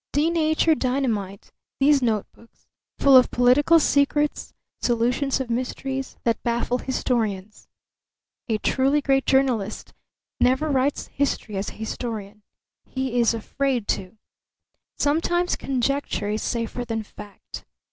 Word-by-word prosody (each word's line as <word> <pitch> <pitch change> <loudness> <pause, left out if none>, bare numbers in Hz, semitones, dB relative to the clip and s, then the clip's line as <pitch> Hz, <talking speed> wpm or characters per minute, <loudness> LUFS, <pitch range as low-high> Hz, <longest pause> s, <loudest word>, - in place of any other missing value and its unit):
Denatured 315 +1 +2
dynamite, 230 -7 -2 0.3
these 280 0 +4
notebooks, 230 0 -4 0.3
full 275 -1 +5
of 255 -1 +7
political 270 +7 +4
secrets, 295 0 +1 0.3
solutions 245 +4 +1
of 255 -3 -4
mysteries 265 +2 -3
that 230 -2 0
baffle 240 +1 -1
historians. 215 -6 -2 0.8
A 220 - +1
truly 270 +6 +1
great 270 -1 +1
journalist 250 -6 0 0.5
never 260 +5 +2
writes 270 +1 0
history 275 -6 -2
as 195 +1 -2
a - - -10
historian; 215 -2 -6 0.4
he 260 -2 -2
is 235 -1 +3
afraid 250 0 -2
to. 190 +3 -2 0.8
Sometimes 345 +4 +1
conjecture 270 -4 -1
is 215 +1 -2
safer 235 +1 -3
than 225 -2 -3
fact. 210 -1 -11
250 Hz, 115 wpm, -24 LUFS, 225-275 Hz, 0.8 s, of